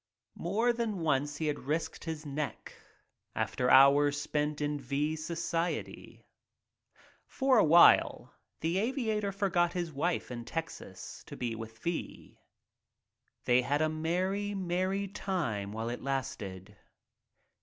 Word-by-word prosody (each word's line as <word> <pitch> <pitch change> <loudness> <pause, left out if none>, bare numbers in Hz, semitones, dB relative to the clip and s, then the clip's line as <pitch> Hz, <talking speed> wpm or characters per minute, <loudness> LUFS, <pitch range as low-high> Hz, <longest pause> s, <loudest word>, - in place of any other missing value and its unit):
More 220 +8 +1
than 225 -6 -2
once 145 -2 0
he 160 - -2
had 150 -1 -1
risked 160 +3 -2
his 160 -2 -5
neck 145 +1 -5 0.6
after 125 - 0
hours 145 +2 +6
spent 150 0 -1
in 150 0 -1
V 140 +4 -1
's 155 - -7
society. 170 +1 -3 1.0
For 265 -3 +3
a - - +6
while 170 +2 +5 0.3
the 165 +4 0
aviator 220 -3 -1
forgot 180 -3 +1
his 175 -2 -3
wife 160 0 -1
in 120 -1 -5
Texas 165 +6 -7
to - - -9
be 120 -2 -2
with 110 0 -8
V. 170 +8 -5 1.1
They 125 +1 +4
had 145 +5 +1
a 155 - +2
merry, 185 +6 -1
merry 190 +2 -1
time 155 - -3
while 110 +2 -3
it 120 - -5
lasted. 105 -8 -4
155 Hz, 130 wpm, -31 LUFS, 140-185 Hz, 1.1 s, hours